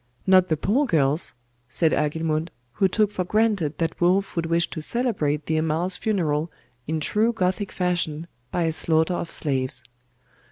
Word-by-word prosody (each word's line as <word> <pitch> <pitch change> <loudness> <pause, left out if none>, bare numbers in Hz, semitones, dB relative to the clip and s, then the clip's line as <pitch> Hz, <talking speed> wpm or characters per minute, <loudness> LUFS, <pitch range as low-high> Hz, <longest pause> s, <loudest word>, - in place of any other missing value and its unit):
'Not 185 -1 +5
the 155 - 0
poor 250 - +1
girls?' 150 - +1 0.3
said 160 +5 +1
Agilmund, 155 +2 0 0.2
who 195 - +2
took 210 +2 +1
for 185 - -2
granted 200 -6 +1
that 165 0 -2
Wulf 185 +3 +2
would 165 -1 -1
wish 170 +1 +1
to 160 - -5
celebrate 155 - 0
the 160 - 0
Amal's 160 +4 0
funeral 165 -7 -1 0.4
in 160 +1 -1
true 215 +9 +2
Gothic 190 -1 -1
fashion 170 -3 -1 0.2
by 175 - -1
a 165 - +1
slaughter 160 +2 +1
of 175 - -3
slaves. 130 -4 0
170 Hz, 160 wpm, -24 LUFS, 155-190 Hz, 0.4 s, Not